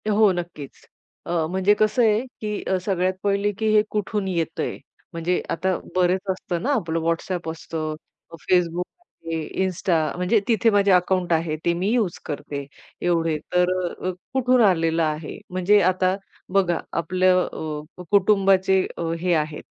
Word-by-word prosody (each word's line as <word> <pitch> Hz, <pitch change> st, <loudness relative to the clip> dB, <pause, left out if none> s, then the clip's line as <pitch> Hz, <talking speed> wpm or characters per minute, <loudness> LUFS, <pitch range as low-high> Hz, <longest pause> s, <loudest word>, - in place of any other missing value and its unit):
हो 210 Hz, -1 st, +5 dB
नक्कीच, 170 Hz, -6 st, -7 dB, 0.4 s
अ, -, -, -5 dB, 0.2 s
म्हणजे 190 Hz, +3 st, +3 dB
कसं 215 Hz, +4 st, +3 dB
आहे 215 Hz, 0 st, +3 dB, 0.2 s
की 210 Hz, -1 st, -3 dB
अ, 190 Hz, -, 0 dB
सगळ्यात 185 Hz, -2 st, +1 dB
पहिले 200 Hz, 0 st, +1 dB
की 220 Hz, -, -1 dB
हे 210 Hz, -, +7 dB
कुठून 210 Hz, -1 st, -1 dB
येतंय 170 Hz, -4 st, -2 dB, 0.4 s
म्हणजे 170 Hz, +2 st, 0 dB
आता 185 Hz, +2 st, 0 dB, 0.2 s
बरेच 185 Hz, +1 st, +3 dB
असतं 180 Hz, -2 st, -4 dB
ना 265 Hz, -, -2 dB
आपलं 165 Hz, -9 st, -1 dB
WhatsApp 165 Hz, +1 st, -2 dB
असतं. 160 Hz, -1 st, -5 dB, 0.4 s
अ, -, -, -8 dB
Facebook 180 Hz, -1 st, +2 dB, 0.4 s
आहे, 165 Hz, -2 st, -3 dB, 0.2 s
Insta 170 Hz, -4 st, 0 dB
म्हणजे 180 Hz, +5 st, +2 dB
तिथे 225 Hz, -1 st, +3 dB
माझे 200 Hz, -2 st, +3 dB
अकाउंट 180 Hz, -1 st, +2 dB
आहे 160 Hz, -1 st, 0 dB
ते 170 Hz, -, +3 dB
मी 180 Hz, +4 st, -1 dB
यूज 215 Hz, -8 st, 0 dB
करते, 145 Hz, -1 st, -5 dB, 0.4 s
एवढे, 165 Hz, -3 st, +1 dB, 0.2 s
तर 180 Hz, 0 st, +3 dB
अ, 175 Hz, +1 st, -4 dB
अ, -, -, +1 dB, 0.2 s
कुठून 255 Hz, -1 st, +3 dB
आलेलं 165 Hz, -3 st, +2 dB
आहे? 155 Hz, 0 st, -3 dB
म्हणजे 185 Hz, +3 st, +3 dB
आता 185 Hz, 0 st, +1 dB, 0.4 s
बघा 185 Hz, -3 st, +2 dB, 0.2 s
आपलं 185 Hz, +2 st, +2 dB
अ, 155 Hz, +2 st, -7 dB
कुटुंबाचे 195 Hz, -1 st, +4 dB
अ, -, -, -4 dB, 0.2 s
हे 180 Hz, 0 st, +2 dB
आहेत 155 Hz, -1 st, -1 dB
180 Hz, 155 wpm, -23 LUFS, 165-195 Hz, 0.4 s, हे